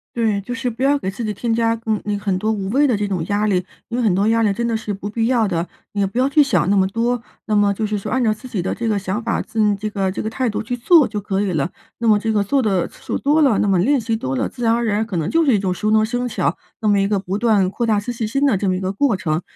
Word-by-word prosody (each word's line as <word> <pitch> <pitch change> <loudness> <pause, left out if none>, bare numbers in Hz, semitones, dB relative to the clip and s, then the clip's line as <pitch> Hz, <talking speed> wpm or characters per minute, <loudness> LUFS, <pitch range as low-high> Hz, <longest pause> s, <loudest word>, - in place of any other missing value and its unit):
对， 220 -4 +1
就 200 +5 -6
是 255 -1 -2
不 235 +2 -8
要 280 +2 +3
给 190 -8 -3
自 230 +4 -5
己 210 - -2
添 230 +4 -2
加， 230 0 +1
嗯 215 -1 0
嗯， 205 -1 -1
很 200 -2 -1
多 215 +3 -1
无 200 -3 -2
谓 280 +6 +3
的 245 - +2
这 205 0 -1
种 185 -5 -2
压 205 +3 0
力， 195 - +2 0.3
因 235 - -3
为 - - +1
很 210 -6 +2
多 195 +2 +2
压 230 0 +3
力 205 -2 +2
真 235 +4 -2
的 230 -1 0
是 220 -2 -4
不 200 +1 -6
必 225 +1 -1
要 240 -3 +2
的， 175 -3 -1 0.2
你 205 - -4
也 195 - +2
不 200 - -7
要 260 +2 +3
去 295 +2 +5
想 190 - +2
那 200 - +3
么 190 0 +3
多。 235 +3 -1 0.3
那 215 - -1
么 205 -1 +3
就 215 +2 -2
是 210 0 -1
说 195 - -5
按 255 -1 +1
照 215 -1 +3
自 250 +4 -11
己 205 -7 -3
的 - - -2
这 230 - -3
个 210 -2 +1
想 195 +3 -3
法， 230 0 -1
自 215 -2 +1
这 210 +2 -4
个 195 -2 -1
这 185 - -4
个 220 - -2
态 250 +3 -1
度 210 - -3
去 245 +3 -3
做 295 +5 +5
就 210 -2 -4
可 195 -1 -2
以 200 -2 0
了。 155 -2 -1 0.3
那 235 - -1
么 215 -1 +5
这 220 +2 -1
个 210 -1 +2
做 275 +6 +2
得 195 -6 +1
次 - - -18
数 - - -2
多 295 +3 +2
了， 265 -8 +4
那 - - +1
么 195 -2 +3
练 270 +9 +3
习 225 0 -1
多 130 -11 -3
了， - - 0
自 245 - -8
然 230 0 +3
而 235 0 0
然 215 +1 0
可 205 -6 -4
能 165 +1 -1
就 330 +9 +3
是 275 -5 +3
一 205 - +3
种 185 -2 -1
熟 215 +4 -1
能 215 0 +4
生 245 +2 -2
巧， - - -1 0.2
那 215 - -1
么 205 -1 +4
一 195 - 0
个 205 - +1
不 190 +1 -3
断 210 -5 +2
扩 235 +5 -2
大 215 -2 +2
自 240 +4 -4
信 230 -1 -3
心 275 +6 0
的 270 - +3
这 195 0 0
么 185 - +1
一 - - -3
个 190 0 -2
过 225 0 +1
程， 160 -2 -1
215 Hz, 360 characters per minute, -20 LUFS, 195-235 Hz, 0.3 s, 去